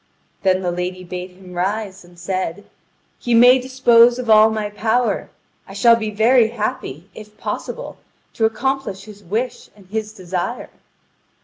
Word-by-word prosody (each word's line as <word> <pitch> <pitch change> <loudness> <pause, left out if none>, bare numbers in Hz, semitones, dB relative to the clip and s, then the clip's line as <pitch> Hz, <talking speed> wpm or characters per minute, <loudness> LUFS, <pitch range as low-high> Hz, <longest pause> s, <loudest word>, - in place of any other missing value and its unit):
Then 190 -1 +2
the 175 - 0
lady 180 +1 -4
bade 180 +1 -6
him 180 0 -15
rise, 195 +2 -3
and 175 0 -19
said: 185 +1 -4 0.5
"He 240 -1 0
may 245 +3 +7
dispose 245 -2 +4
of 245 -3 -1
all 215 0 +7
my 215 -1 -3
power! 220 0 0 0.4
I 195 - -11
shall 235 +3 +5
be 220 -2 -3
very 225 +3 +4
happy, 215 - -4
if 210 0 -13
possible, - - -6 0.4
to 225 - +1
accomplish 240 -3 -2
his 205 -1 -13
wish 220 +8 -4
and 200 -2 -18
his 215 0 -3
desire." 185 +3 -5
215 Hz, 150 wpm, -20 LUFS, 185-235 Hz, 0.5 s, may